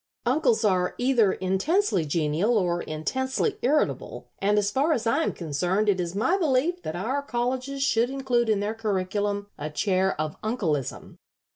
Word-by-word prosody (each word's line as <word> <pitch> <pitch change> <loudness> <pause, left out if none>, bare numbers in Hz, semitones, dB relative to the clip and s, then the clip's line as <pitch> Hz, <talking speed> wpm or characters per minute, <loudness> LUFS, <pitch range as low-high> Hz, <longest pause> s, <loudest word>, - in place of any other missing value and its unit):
Uncles 245 -4 +2
are 185 -3 +1
either 245 -5 +3
intensely 190 - +1
genial 165 +9 +1
or 175 -3 0
intensely 260 - -2
irritable, 290 +5 -1
and 205 +1 +2
as 205 0 +2
far 285 +7 +2
as 235 -4 -2
I 230 +8 +2
am - - 0
concerned 175 +6 -1
it 190 -2 +2
is 175 0 -3
my 295 - +1
belief 325 +3 +1
that 160 - -5
our 240 +11 -1
colleges 260 +1 -2
should 235 -2 +2
include 255 -4 0
in 210 -2 +2
their 210 +2 -1
curriculum 205 -1 -2
a 150 +1 -3
chair 190 +2 0
of 155 0 -3
'Uncleism.' 175 - -2
215 Hz, 160 wpm, -26 LUFS, 185-260 Hz, -, either